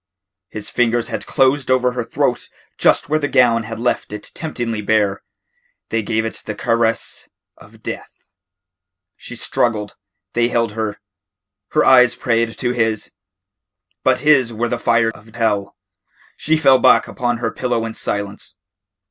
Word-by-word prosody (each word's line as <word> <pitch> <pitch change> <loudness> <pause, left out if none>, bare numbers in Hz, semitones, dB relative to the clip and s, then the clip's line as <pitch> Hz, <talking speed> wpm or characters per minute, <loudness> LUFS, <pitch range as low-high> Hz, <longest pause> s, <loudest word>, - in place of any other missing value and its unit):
His 105 -1 -6
fingers 120 -1 +1
had - - -4
closed 135 +1 +2
over 125 -1 +3
her 125 -1 -3
throat 115 - -1 0.3
just - - +3
where 155 +1 +1
the 145 - -1
gown 115 -4 +3
had 115 0 -6
left 120 -2 -1
it 105 0 -7
temptingly 120 -9 -3
bare. 105 -2 +1 0.7
They 115 - 0
gave 110 +1 -1
it 110 - -5
the 105 - -3
caress 115 0 -1 0.3
of - - -18
death. - - -8 0.9
She - - -8
struggled. 105 -3 -1 0.4
They 120 0 +2
held 115 -2 0
her. 110 -1 -4 0.7
Her - - +3
eyes 125 -2 +6
prayed 115 -2 0
to 120 -2 -1
his. 110 -3 -1 0.9
But - - +2
his 140 -5 +4
were 115 +1 -2
the 120 - -2
fire 115 -1 +2
of 110 +1 -17
hell. 105 -4 0 0.6
She 160 +1 +1
fell 135 -4 +5
back - - +5
upon 120 -1 -2
her 115 -1 -2
pillow 120 -3 -1
in 115 - -5
silence. 100 -1 -4
115 Hz, 150 wpm, -19 LUFS, 110-125 Hz, 0.9 s, eyes